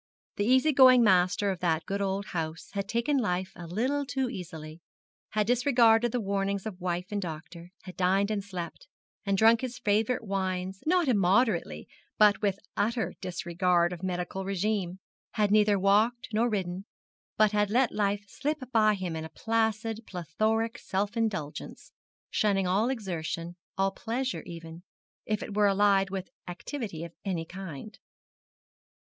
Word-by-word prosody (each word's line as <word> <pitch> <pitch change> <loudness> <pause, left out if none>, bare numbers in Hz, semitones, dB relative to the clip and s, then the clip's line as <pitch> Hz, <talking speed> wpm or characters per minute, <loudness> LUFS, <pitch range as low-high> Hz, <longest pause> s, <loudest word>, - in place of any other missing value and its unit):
The 205 - +1
easy 260 +6 +4
going 255 -2 +7
master 185 0 +3
of 185 - -5
that 165 -3 0
good 200 +1 -2
old 195 0 -1
house 160 -1 -4
had 200 -1 -3
taken 245 +5 +1
life 185 -4 -1
a 175 -1 -8
little 255 - 0
too 260 -2 -2
easily, 160 -5 -8 0.5
had 215 -1 +2
disregarded 240 -1 +4
the 245 - 0
warnings 200 -1 -1
of 195 -4 -6
wife 180 +1 -3
and 205 -1 -1
doctor, 170 0 -7
had 185 -1 -10
dined 195 +3 +2
and 205 -2 -1
slept, 185 - -7 0.4
and 195 0 +2
drunk 225 +3 +5
his 250 -2 -4
favourite 220 +4 +1
wines 190 -2 -3
not 350 -1 +3
immoderately, 195 - +2 0.3
but 205 -2 +5
with 200 -2 +1 0.2
utter 220 -4 0
disregard 175 0 +1
of 175 - -8
medical 185 +1 -3
regimen 195 -1 -1 0.4
had 210 -3 +1
neither 210 -1 +4
walked, 210 +5 +2
nor 230 +3 +2
ridden, 190 -2 -3 0.5
but 215 -1 +5
had 210 -1 +1
let 245 +3 +3
life 205 -1 0
slip 300 +8 -2
by 215 -3 +4
him 185 -4 -4
in 160 - -4
a 160 - -7
placid, 225 0 -1
plethoric 215 +6 -1
self 200 +3 -2
indulgence 205 -10 -3 0.4
shunning 200 -3 +2
all 200 +6 +2
exertion, 175 -7 -4 0.2
all 195 0 +2
pleasure 245 +5 -3
even, 165 0 -9 0.5
if 215 -1 -1
it 200 - -7
were 210 -1 +4
allied 195 0 +3
with 190 -1 -5 0.2
activity 180 - -5
of 170 -1 -8
any 175 -5 -2
kind. 185 +2 -9
200 Hz, 155 wpm, -28 LUFS, 180-225 Hz, 0.5 s, going